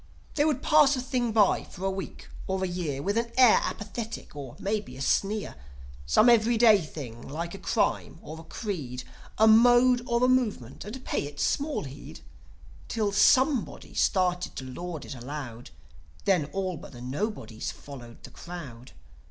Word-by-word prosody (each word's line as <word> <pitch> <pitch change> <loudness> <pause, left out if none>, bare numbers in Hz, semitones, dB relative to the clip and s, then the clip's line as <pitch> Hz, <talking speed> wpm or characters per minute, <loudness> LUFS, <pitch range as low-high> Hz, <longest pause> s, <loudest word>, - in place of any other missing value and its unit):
They 295 - +2
would 295 -4 0
pass 300 -2 +5
a - - -3
thing 250 -2 -1
by 210 -3 +3
for 190 +1 -8
a 195 - +1
week 190 0 -7 0.2
or 190 0 -1
a - - +1
year, 165 -6 -3
With 205 +3 +1
an 235 0 -3
air 250 -4 +7
apathetic, 225 -3 -5
or 135 -4 -8
maybe 205 -10 -3
a - - -10
sneer: 205 +8 0 0.5
Some 145 - +5
ev'ryday 230 -2 +5
thing, 130 -7 -8
like 165 +4 -5
a 195 - -8
crime - - -1
or 160 +1 -8
a - - -10
creed, 155 - -5 0.3
A 220 - +5
mode 245 +2 +6
or 235 0 +1
a - - +5
movement, 220 - 0
and 250 +5 -8
pay - - -1
it 145 0 -11
small 295 +1 0
heed, 140 0 -10 0.7
Till 215 -3 -1
Somebody 260 +4 +2
started 180 -2 +1
to 130 - -6
laud 165 +5 -6
it - - -7
aloud; 125 -2 -7 0.6
Then 180 -7 +3
all 185 +3 -3
but - - -12
the 120 - -10
Nobodies 130 - -4
followed 120 -5 -12
the - - -11
crowd. 140 -9 -9
190 Hz, 170 wpm, -27 LUFS, 145-235 Hz, 0.7 s, air